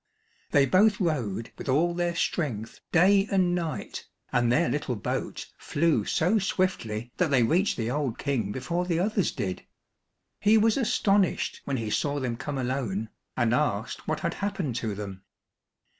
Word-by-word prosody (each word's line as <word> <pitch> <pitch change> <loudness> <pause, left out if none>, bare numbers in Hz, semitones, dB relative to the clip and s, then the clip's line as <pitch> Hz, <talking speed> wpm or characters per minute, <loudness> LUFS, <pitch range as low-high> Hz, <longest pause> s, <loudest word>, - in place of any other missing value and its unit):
They 140 -1 +4
both 205 - +4
rowed 120 - -1
with - - -5
all 165 +6 +3
their 175 0 -1
strength 125 - -2
day 195 +3 +5
and 185 -3 +3
night, 170 -3 -4 0.3
and 120 -1 +3
their 125 - +3
little 130 0 -1
boat 105 - -3
flew 165 +2 +1
so 185 +7 +2
swiftly 125 - -1
that 180 -3 +2
they 130 -4 +4
reached 175 - +2
the 115 0 -1
old 140 -4 -1
King 125 -8 -1
before 170 +10 -2
the 170 -2 +1
others 195 +1 +1
did. 95 -2 -4 0.8
He 215 +2 +5
was 220 0 +4
astonished 205 -6 +1
when 140 -1 -1
he 110 -3 -3
saw 145 +4 0
them 125 -3 -2
come 140 +4 -4
alone, 120 -5 -2 0.3
and 120 -1 +2
asked 120 -6 -1
what 155 0 -1
had 170 -1 -1
happened 185 - -2
to 110 -4 -2
them. 100 -2 -7
145 Hz, 160 wpm, -27 LUFS, 120-180 Hz, 0.8 s, day